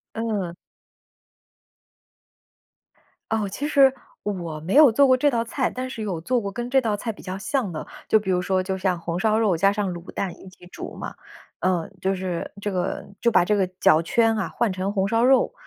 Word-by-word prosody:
嗯。 210 -7 -2 2.8
哦， 220 -2 +1
其 280 +9 -4
实 270 -3 +5 0.3
我 170 -6 -4
没 160 +5 -4
有 290 -3 +8
做 275 +5 +5
过 260 - +5
这 290 +3 +3
道 230 -3 0
菜， 250 +2 -1
但 255 0 -5
是 235 - -6
有 195 -6 -3
做 245 +9 0
过 200 -2 -4
跟 240 +4 -4
这 265 +1 +4
道 215 -3 -1
菜 225 +2 -3
比 210 - -13
较 185 0 -5
像 245 -1 -1
的。 155 - -5 0.2
就 220 - +5
比 190 -3 -2
如 180 - +2
说， 185 0 0
就 190 0 -2
像 185 -2 0
红 170 +1 -3
烧 215 +2 +2
肉 210 -6 +2
加 195 +4 +3
上 205 -2 -1
卤 170 +2 -9
蛋 190 -3 -3
一 190 - -11
起 185 - -17
煮 - - -8
嘛。 - - -6 0.5
呃， 180 -3 0
就 190 +1 +1
是 185 -2 -4
这 205 - -2
个 180 -1 -2 0.2
就 235 - +4
把 - - +5
这 210 +3 +2
个 190 -2 +2
脚 155 - +5
圈 225 +6 +2
啊， 200 - -1
换 235 -4 0
成 190 +2 -2
红 195 -1 +1
烧 230 +3 +2
肉， 265 +1 +4
200 Hz, 225 characters per minute, -24 LUFS, 185-230 Hz, 2.8 s, 有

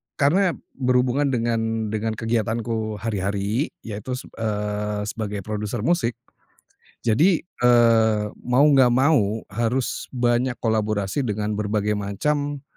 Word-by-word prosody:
karena 170 +3 +2 0.2
berhubungan 125 +2 +2
dengan 115 -3 -1
dengan 110 0 -2
kegiatanku 115 -1 -1
hari-hari 100 - -1 0.2
yaitu 110 +3 -5
seb 130 - -9
eee, 105 -1 -2
sebagai 105 -2 -4
produser 105 +2 -3
musik 125 -5 +1 0.9
jadi, 155 - +3
eee, 115 -7 +3 0.2
mau 125 +3 +4
nggak 140 -4 +6
mau 120 -4 +2
harus 120 +4 -1
banyak 120 +1 +1
kolaborasi 110 0 0
dengan 105 0 -2
berbagai 105 0 -1
macam, 145 +8 -2
115 Hz, 110 wpm, -23 LUFS, 105-125 Hz, 0.9 s, nggak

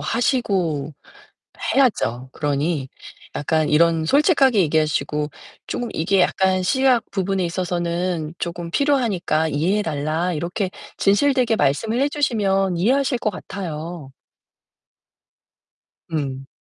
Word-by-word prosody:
하시고 185 - 0 0.8
해야죠. 130 - +1
그러니 145 -1 -1 0.5
약간 155 +1 0
이런 165 +1 +3
솔직하게 275 - +4
얘기하시고 150 -1 0 0.4
"쪼금 245 - -3
이게 185 +4 +1
약간 185 +1 +2
시약 260 +4 +2
부분에 195 -1 0
있어서는 175 -2 -2
쪼금 170 0 -4
필요하니까 205 - +1
이해해 175 +9 +1
달라." 160 +2 -1
이렇게 175 +4 -2 0.3
진실되게 245 +2 +3
말씀을 215 - +1
해 280 - +3
주시면 195 - +1
이해하실 255 +7 +2
것 215 - 0
같아요. 170 -6 -7 2.0
음. 135 -4 -3
175 Hz, 260 characters per minute, -21 LUFS, 155-220 Hz, 2.0 s, 솔직하게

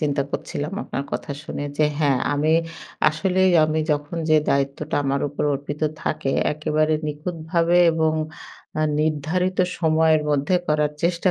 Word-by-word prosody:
চিন্তা 145 -2 0
করছিলাম 150 +5 -4
আপনার 140 - -4
কথা - - -4
শুনে। 145 - -5 0.2
যে 155 - +5 0.2
হ্যাঁ, 140 -4 +3
আমি 150 +2 +1 0.6
আসলেই 185 +4 +2
আমি 155 0 0
যখন 145 +3 -3
যে 155 - +6
দায়িত্বটা 140 +2 -1
আমার 140 0 0
উপর 145 - -4
অর্পিত 145 +2 -6 0.2
থাকে 135 -3 -1 0.2
একেবারে 155 +1 +1
নিখুঁতভাবে 165 +2 -1 0.2
এবং 160 -1 +1 0.7
আ - - +2 0.2
নির্ধারিত 160 +5 0 0.2
সময়ের 160 -1 +3
মধ্যে 145 +5 +1
করার 150 -1 +1
চেষ্টা 170 +2 +2
155 Hz, 140 wpm, -22 LUFS, 145-160 Hz, 0.7 s, যে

